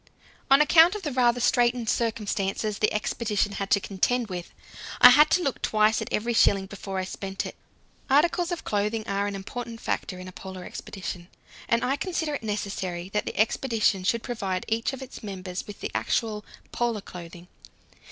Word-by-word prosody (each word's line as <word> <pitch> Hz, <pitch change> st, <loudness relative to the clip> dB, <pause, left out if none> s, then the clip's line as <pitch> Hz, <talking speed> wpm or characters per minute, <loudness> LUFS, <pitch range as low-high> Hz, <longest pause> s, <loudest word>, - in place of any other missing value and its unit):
On 275 Hz, +2 st, +7 dB
account 330 Hz, +5 st, +6 dB
of 420 Hz, -, -6 dB
the 300 Hz, -, -2 dB
rather 245 Hz, -1 st, +3 dB
straitened 240 Hz, -1 st, +2 dB
circumstances 210 Hz, -2 st, -1 dB
the 215 Hz, -, +2 dB
expedition 210 Hz, -1 st, -1 dB
had 195 Hz, -1 st, -4 dB
to 200 Hz, -, +4 dB
contend 220 Hz, +5 st, 0 dB
with, 175 Hz, -2 st, -6 dB, 0.5 s
I -, -, +11 dB
had 300 Hz, +1 st, +7 dB
to 360 Hz, -, +3 dB
look 275 Hz, -, -2 dB
twice 215 Hz, 0 st, +2 dB
at -, -, -6 dB
every 235 Hz, +3 st, 0 dB
shilling 195 Hz, -3 st, +4 dB
before 195 Hz, -1 st, -6 dB
I 185 Hz, -, 0 dB
spent 195 Hz, +1 st, -5 dB
it. -, -, -7 dB, 0.5 s
Articles 340 Hz, +5 st, +3 dB
of 345 Hz, -, -3 dB
clothing 210 Hz, +1 st, -1 dB
are 200 Hz, +1 st, 0 dB
an 200 Hz, -, -3 dB
important 230 Hz, +4 st, -6 dB
factor 185 Hz, -, -3 dB
in 185 Hz, 0 st, -8 dB
a -, -, -8 dB
Polar 190 Hz, 0 st, -9 dB
expedition, 180 Hz, -2 st, -7 dB, 0.4 s
and 235 Hz, 0 st, +2 dB
I 270 Hz, +3 st, +1 dB
consider 325 Hz, -4 st, -2 dB
it 285 Hz, -, -3 dB
necessary 195 Hz, -4 st, -3 dB
that 210 Hz, +1 st, -2 dB
the -, -, -5 dB
expedition 220 Hz, -3 st, +2 dB
should 230 Hz, +5 st, +1 dB
provide 195 Hz, -7 st, -3 dB
each 225 Hz, +3 st, 0 dB
of 265 Hz, -1 st, -7 dB
its 260 Hz, -, -10 dB
members 190 Hz, -3 st, -6 dB
with 205 Hz, -, -10 dB
the -, -, -4 dB
actual 215 Hz, -3 st, -1 dB, 0.3 s
"Polar 235 Hz, -3 st, -1 dB
clothing." 175 Hz, -1 st, -10 dB
215 Hz, 180 wpm, -26 LUFS, 195-245 Hz, 0.5 s, I